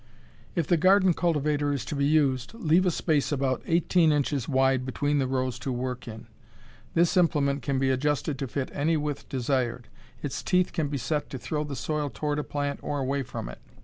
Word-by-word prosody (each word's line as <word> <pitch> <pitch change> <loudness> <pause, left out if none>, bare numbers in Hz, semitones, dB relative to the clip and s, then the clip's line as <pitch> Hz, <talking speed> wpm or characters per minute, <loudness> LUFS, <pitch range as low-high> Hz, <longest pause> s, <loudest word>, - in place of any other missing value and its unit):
If 170 - +1
the 175 - +3
garden 185 +2 +5
cultivator 150 -4 +1
is 140 -3 -2
to 150 - -4
be 140 0 +1
used, 140 - +1
leave 180 -3 +3
a - - +5
space 155 -4 0
about 135 -2 0
eighteen 170 -1 +3
inches 145 -3 0
wide 130 -1 +3
between 145 +3 0
the 130 - +1
rows 130 -1 -1
to 135 - -3
work 125 0 -4
in. 110 -1 -8 0.7
This 170 +3 +3
implement 145 -6 +2
can 135 +2 -1
be 135 0 +2
adjusted 145 +1 0
to 135 - -2
fit 130 +1 -3
any 160 +3 +1
width 150 -1 -4
desired. 125 -2 -1 0.3
Its 145 - -3
teeth 180 -1 +1
can 155 -3 0
be 140 0 -2
set 145 +4 -2
to 135 - -5
throw 150 +4 -3
the 145 -2 -5
soil 150 +3 -2
toward 145 +5 -2
a - - -1
plant 145 -1 -3
or 145 - -3
away 140 +1 -1
from 125 - -6
it. - - -9
145 Hz, 205 wpm, -27 LUFS, 130-155 Hz, 0.7 s, garden